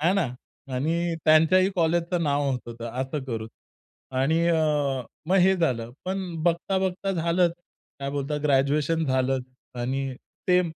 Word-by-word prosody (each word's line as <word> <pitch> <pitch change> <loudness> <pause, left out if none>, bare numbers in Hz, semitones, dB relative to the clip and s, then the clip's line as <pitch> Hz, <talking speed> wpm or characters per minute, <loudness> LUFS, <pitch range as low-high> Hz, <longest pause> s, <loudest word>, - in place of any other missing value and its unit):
आहे 170 +4 +3
ना 190 -7 +2 0.5
आणि 165 +5 0
त्यांच्याही 160 +5 +5
कॉलेजचं 170 +1 +1
नाव 145 -2 +1
होत 130 - 0
होतं 115 0 -6
असं 135 +2 -3
करून 115 -3 -4 0.7
आणि 160 +5 +2
अ, 150 -5 +1 0.2
मग 185 - +3
हे 190 +1 +5
झालं 120 -9 0
पण 190 +1 -2 0.2
बघता 175 +3 +1
बघता 190 +1 -1
झालंच 170 0 +2 0.5
काय 140 0 -2
बोलता 145 +1 -2
ग्रॅज्युएशन 150 +3 +2
झालं 130 0 +1 0.4
आणि 135 +2 -2 0.3
ते 180 0 +5
155 Hz, 140 wpm, -26 LUFS, 135-175 Hz, 0.7 s, त्यांच्याही